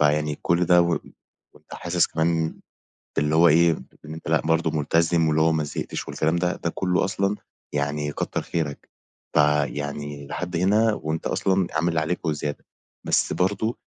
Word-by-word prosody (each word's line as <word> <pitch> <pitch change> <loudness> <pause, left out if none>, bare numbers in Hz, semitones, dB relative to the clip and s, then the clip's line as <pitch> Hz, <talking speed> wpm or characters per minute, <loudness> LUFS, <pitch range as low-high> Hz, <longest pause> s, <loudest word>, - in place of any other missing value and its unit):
فيعني 75 0 +2
كل 85 +1 +2
ده 90 0 +5
و 85 0 +1 0.6
وأنت - - -13
حاسس 85 0 +1
كمان 80 0 -1 0.6
اللي 75 +1 +1
هو 85 +1 +6
إيه 85 +2 +5 0.3
إن 75 - -7
أنت 80 -1 -9
لأ 80 -1 +3
برضه 80 +1 +1
ملتزم، 80 +2 +2
واللي 75 0 +2
هو 80 - +4
ما 80 -1 0
زهقتش 75 - -5
والكلام 80 +2 0
ده، 90 0 0
ده 85 - -2
كلّه 90 -1 +1
أصلًا 100 +1 0 0.4
يعني 75 0 -1
كتَّر - - -2
خيرك، 75 -4 -4 0.5
فيعني 75 -1 0
لحد 90 +4 -4
هنا 105 +5 +3
وأنت 80 -4 -4
أصلًا 95 -2 +1
عامل 80 +2 +1
اللي 85 -2 +1
عليك 85 +3 -2
وزيادة، 75 -2 -3 0.4
بس - - +2
برضه 100 +5 0
80 Hz, 165 wpm, -24 LUFS, 75-90 Hz, 0.6 s, هو